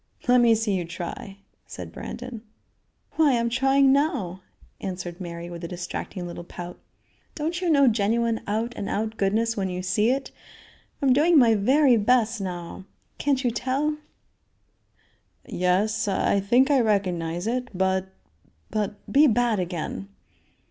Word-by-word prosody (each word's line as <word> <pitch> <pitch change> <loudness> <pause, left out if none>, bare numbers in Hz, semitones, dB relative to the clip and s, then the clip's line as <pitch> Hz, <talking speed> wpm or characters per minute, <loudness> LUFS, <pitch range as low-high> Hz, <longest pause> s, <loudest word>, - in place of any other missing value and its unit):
"Let 250 0 +6
me 230 -1 +5
see 220 -2 0
you 185 -2 0
try," 180 +3 -7 0.3
said - - -8
Brandon. 245 -2 -7 0.8
"Why, 295 -6 +4
I'm 235 0 0
trying 270 +2 +4
now," 250 - 0 0.4
answered 180 -1 -6
Mary 170 -1 -6
with 170 0 -8
a - - -3
distracting 175 +1 -5
little 175 0 -7
pout. 175 0 -9 0.6
"Don't 330 +4 -2
you 360 - 0
know 280 -4 +5
genuine 225 +1 +1
out 225 +4 -1
and 200 - -4
out 220 +1 -2
goodness 220 +3 +1
when 190 -2 -1
you 180 0 -4
see 200 +5 +2
it? 265 +1 -1 0.7
I'm 265 -2 +5
doing 315 +5 +4
my 235 -5 +6
very 255 +5 +4
best 225 0 +2
now. 180 -1 -6 0.3
Can't 275 -2 +1
you 245 - +1
tell?" 270 +6 -1 1.5
"Yes, 210 +5 0
I 200 0 +1
think 245 +8 +3
I 275 - +5
recognize 180 -6 0
it; 250 +2 -1
but 190 0 0 0.6
but 210 -1 -1 0.2
be 295 +3 +7
bad 235 -3 +2
again." 180 +2 -4
220 Hz, 145 wpm, -25 LUFS, 185-255 Hz, 1.5 s, be